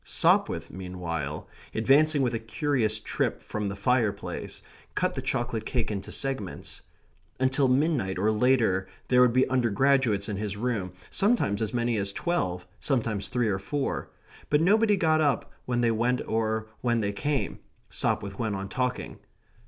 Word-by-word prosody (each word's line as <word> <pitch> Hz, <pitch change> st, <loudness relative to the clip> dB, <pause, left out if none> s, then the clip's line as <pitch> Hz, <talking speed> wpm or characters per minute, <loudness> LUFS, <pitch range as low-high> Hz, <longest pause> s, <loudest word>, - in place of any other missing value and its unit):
Sopwith, 85 Hz, 0 st, +2 dB
meanwhile, 85 Hz, -5 st, -4 dB, 0.3 s
advancing 140 Hz, +5 st, +4 dB
with 125 Hz, -1 st, +1 dB
a 115 Hz, -, -1 dB
curious 115 Hz, -1 st, 0 dB
trip 110 Hz, -, -2 dB
from 105 Hz, -1 st, -3 dB
the 100 Hz, -, -4 dB
fire 115 Hz, +1 st, +2 dB
place, -, -, -7 dB, 0.3 s
cut -, -, +1 dB
the -, -, -3 dB
chocolate 120 Hz, -2 st, -1 dB
cake 115 Hz, -1 st, -1 dB
into 100 Hz, -2 st, -4 dB
segments. 135 Hz, -9 st, -4 dB, 0.6 s
Until 130 Hz, +1 st, +3 dB
midnight 130 Hz, -, +1 dB
or 105 Hz, +4 st, +2 dB
later 110 Hz, -5 st, +2 dB, 0.2 s
there 125 Hz, 0 st, +5 dB
would 125 Hz, -1 st, +6 dB
be 130 Hz, +2 st, +3 dB
undergraduates 125 Hz, -3 st, +2 dB
in 105 Hz, -, -3 dB
his 105 Hz, -1 st, -3 dB
room, 105 Hz, -5 st, -1 dB, 0.2 s
sometimes 195 Hz, -, +2 dB
as 110 Hz, -2 st, 0 dB
many 120 Hz, -2 st, 0 dB
as 100 Hz, -1 st, -1 dB
twelve, 90 Hz, -, -1 dB
sometimes 115 Hz, -7 st, -1 dB
three 120 Hz, -2 st, 0 dB
or 95 Hz, -2 st, 0 dB
four; 140 Hz, +8 st, -2 dB, 0.4 s
but 150 Hz, -, +4 dB
nobody 210 Hz, +4 st, +4 dB
got 160 Hz, -3 st, +3 dB
up 140 Hz, -6 st, +1 dB, 0.2 s
when 120 Hz, -1 st, +1 dB
they 120 Hz, -1 st, +3 dB
went 120 Hz, +3 st, +1 dB
or 110 Hz, 0 st, 0 dB, 0.2 s
when 120 Hz, -2 st, +1 dB
they 100 Hz, -1 st, 0 dB
came; 145 Hz, +7 st, -2 dB, 0.3 s
Sopwith 100 Hz, -1 st, -1 dB
went 110 Hz, -3 st, -1 dB
on 95 Hz, 0 st, -5 dB
talking. 125 Hz, -1 st, -2 dB
115 Hz, 160 wpm, -27 LUFS, 100-130 Hz, 0.6 s, would